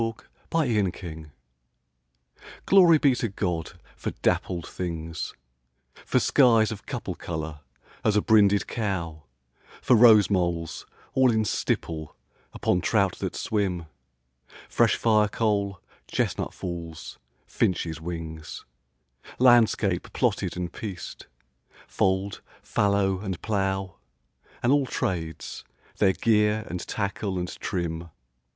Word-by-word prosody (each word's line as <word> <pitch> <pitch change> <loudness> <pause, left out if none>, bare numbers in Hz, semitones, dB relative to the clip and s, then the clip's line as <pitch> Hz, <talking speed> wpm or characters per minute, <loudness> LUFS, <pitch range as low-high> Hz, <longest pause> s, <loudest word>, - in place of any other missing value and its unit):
13 115 0 -4 0.2
Pied 165 -3 +1
Beauty 90 -7 -2 1.4
GLORY 180 -4 +7
be 140 -3 +4
to 125 -1 -1
God 90 -4 -3 0.2
for - - -4
dappled 85 -2 0
things 85 -2 -5 0.7
For - - 0
skies 115 -5 +4
of 105 -2 -8
couple - - -4
colour 80 -2 -5 0.4
as 105 - +2
a - - +4
brinded 100 -2 +4
cow; 90 -8 -3 0.6
For 125 - +4
rose 110 -4 +7
moles 85 -4 -1 0.3
all 130 -1 +4
in 110 -1 +1
stipple 80 -5 -2 0.4
upon 90 - 0
trout 100 -2 +1
that - - -3
swim: 95 -5 -1 0.8
Fresh - - +3
firecoal 105 -2 +1 0.3
chestnut - - -1
falls; 85 -3 -7 0.3
finches' 80 -3 -1
wings; 80 -2 -6 0.7
Landscape 115 -7 +4
plotted - - 0
and 90 -1 -4
pieced 100 -5 -7 0.6
fold, 95 +1 0 0.2
fallow, 100 -2 +1
and 95 -3 -4
plough; 95 -3 -1 0.7
And 120 - +3
àll 145 -2 +2
tràdes, 80 -4 -3 0.4
their 95 -2 +4
gear 105 0 +2
and 90 - -4
tackle 100 -1 -2
and 90 0 -4
trim. 85 -3 -3
95 Hz, 110 wpm, -26 LUFS, 85-110 Hz, 1.4 s, GLORY